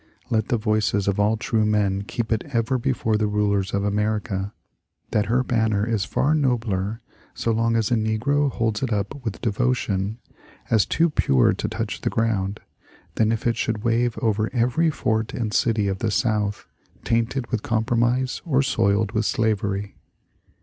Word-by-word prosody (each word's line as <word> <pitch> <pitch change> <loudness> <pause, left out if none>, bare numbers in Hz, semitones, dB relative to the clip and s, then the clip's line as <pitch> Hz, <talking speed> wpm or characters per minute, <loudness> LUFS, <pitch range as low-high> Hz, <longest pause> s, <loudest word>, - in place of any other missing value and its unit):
*' - - -34
Let 110 -2 +1
the 120 - +1
voices 105 -2 0
of 100 0 +1
all 105 +2 +2
true 110 -1 0
men 105 -2 +1
keep 110 +2 -4
it 110 0 +1
ever 120 +1 +1
before 115 -4 0
the 105 - +1
nilers 105 -2 0
of 100 0 0
America, 105 -1 -1 0.6
that 105 -2 +1
her 125 +3 +2
banner 110 -4 +1
is 110 -5 0
far 145 - +1
nobler 115 -7 0 0.3
so 115 - -1
long 115 +1 +1
as 115 -1 +1
a - - +4
negro 120 +7 +1
holds 115 -2 -1
it 130 -3 -1
up 105 +6 -2
with 110 -3 -4
devotion, 110 -3 0 0.5
as 110 -3 +4
too 165 0 +2
pure 65 - +3
to - - -3
touch - - -4
the - - 0
ground, 105 -3 -1 0.5
than 110 0 +2
if 115 - -2
it 115 -2 +1
should 110 -2 -2
wave 120 0 +1
over 110 -1 +1
every 125 +7 +2
fort 110 -6 -1
and 110 -3 -2
city 110 -3 +2
of 95 -1 -2
the 115 - 0
South 105 -1 0 0.4
tainted 115 +3 -1
with 115 -4 0
com 110 0 0
promise 120 +2 +1
or 140 -5 +2
soiled 100 -4 +1
with 110 -1 0
slavery. 100 -2 -1
110 Hz, 175 wpm, -23 LUFS, 105-120 Hz, 0.6 s, a